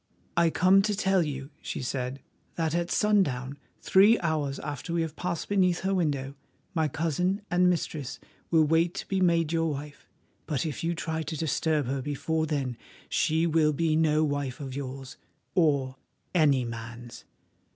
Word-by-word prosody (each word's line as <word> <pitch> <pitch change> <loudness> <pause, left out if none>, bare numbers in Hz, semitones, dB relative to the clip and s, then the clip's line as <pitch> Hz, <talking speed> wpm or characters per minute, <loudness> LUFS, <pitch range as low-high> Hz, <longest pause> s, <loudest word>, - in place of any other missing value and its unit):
"I 170 -1 +4
come 185 +4 +5
to 210 +1 0
tell 190 -2 +2
you," 140 -2 -4
she - - -4
said, 130 +1 -3 0.3
"that 160 -2 -1
at 170 0 0
sundown, 145 -12 +1 0.2
three 205 +4 +5
hours 155 -5 -1
after 145 +3 -5
we 170 -1 +1
have 160 -1 -5
passed 175 -1 -3
beneath 185 -3 +2
her 195 +1 0
window, 145 -7 -1 0.4
my 160 -3 +1
cousin 180 +7 -1
and 180 +1 +4
mistress 155 -5 -2 0.3
will 160 -2 +5
wait 165 +3 +2
to - - -5
be 190 -1 0
made 170 -3 +3
your 165 -1 +1
wife, 145 0 -7 0.4
but 145 -2 -1
if 155 0 -4
you 170 +1 0
try 160 -1 -3
to 160 0 -4
disturb 155 -1 0
her 135 +2 -2
before 155 +3 -1
then 135 -5 -2 0.3
she 160 +2 +2
will 155 -2 +3
be 160 +1 +1
no 155 -1 +3
wife 145 -3 -2
of 135 -3 -6
yours, 135 -1 -6 0.4
or 140 -7 +2 0.4
any 145 -7 +3
man's." 115 +1 -8
155 Hz, 165 wpm, -28 LUFS, 140-170 Hz, 0.4 s, come